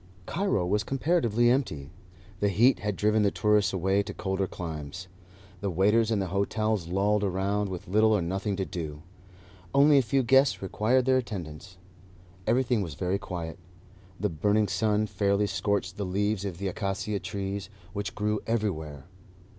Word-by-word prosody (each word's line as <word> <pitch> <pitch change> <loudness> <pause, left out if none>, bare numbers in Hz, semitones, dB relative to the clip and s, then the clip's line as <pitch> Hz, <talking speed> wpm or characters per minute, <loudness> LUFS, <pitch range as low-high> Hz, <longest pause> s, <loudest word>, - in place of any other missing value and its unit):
Cairo 170 - 0
was 105 +4 +1
comparatively 125 -4 +1
empty. 80 - -1 0.5
The 100 - +2
heat 120 +6 +4
had 105 -2 -2
driven 105 +3 +2
the 100 - +4
tourists 105 0 +2
away 95 +2 +1
to 100 0 -7
colder 95 0 -1
climes. 80 +1 -6 0.5
The 100 - -2
waiters 105 +5 +3
in 110 - +1
the 95 -2 -2
hotels 105 -1 0
lolled 100 +3 +1
around, 100 +2 0
with 90 -2 -6
little 110 +4 +4
or 105 -3 +3
nothing 95 +3 -2
to 95 0 -2
do. 80 -4 -6 0.7
Only 140 +1 +6
a - - +4
few 135 +2 +1
guests 135 +3 +4
required 115 +6 +1
their 130 0 +4
attendance. 90 -6 -6 0.7
Everything 120 -1 +2
was 85 -7 -5
very 95 +3 -1
quiet. 85 -3 -6 0.6
The - - 0
burning 105 +6 +1
sun 105 +3 +1
fairly 100 -1 +1
scorched 100 -2 -1
the 100 - -2
leaves 100 +2 0
of 95 -4 -4
the 100 +2 -3
acacia 100 +2 -2
trees, 100 +1 -4 0.2
which 100 -1 -4
grew 105 0 0
everywhere. 80 -11 -2
100 Hz, 160 wpm, -28 LUFS, 95-110 Hz, 0.7 s, Only